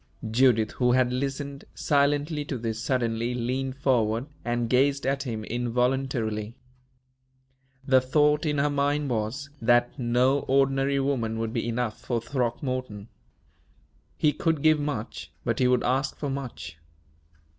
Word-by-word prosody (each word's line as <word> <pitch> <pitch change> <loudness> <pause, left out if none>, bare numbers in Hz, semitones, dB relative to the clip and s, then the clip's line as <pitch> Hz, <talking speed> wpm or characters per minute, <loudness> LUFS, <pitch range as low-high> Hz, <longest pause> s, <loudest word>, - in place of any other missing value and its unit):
Judith, 115 -2 +3
who 125 -1 +2
had 125 -1 +2
listened 140 +1 -3
silently 145 +1 +1
to 140 -2 -4
this, 115 -1 -3
suddenly 120 -1 -1
leaned 130 +2 -2
forward 120 -4 +1 0.2
and 120 0 -1
gazed 135 +3 +2
at 135 +1 0
him 115 -5 -4
involuntarily. 120 -2 -1 1.3
The 130 -1 +5
thought 150 +3 +2
in 150 -2 0
her 145 +1 +2
mind 145 0 0
was, 120 +6 -3
that 120 +3 +2
no 125 +3 +2
ordinary 135 +1 +2
woman 125 -5 -1
would 115 0 -3
be - - -2
enough 115 -1 -2
for 120 -2 -1
Throckmorton. 120 -3 -3 1.1
He 150 -1 +3
could 160 0 0
give 155 -1 +5
much, 145 -7 -4
but - - 0
he 125 - +4
would 125 -1 +2
ask 135 +2 0
for 145 -2 -3
much. 125 - -6
130 Hz, 135 wpm, -26 LUFS, 120-140 Hz, 1.3 s, The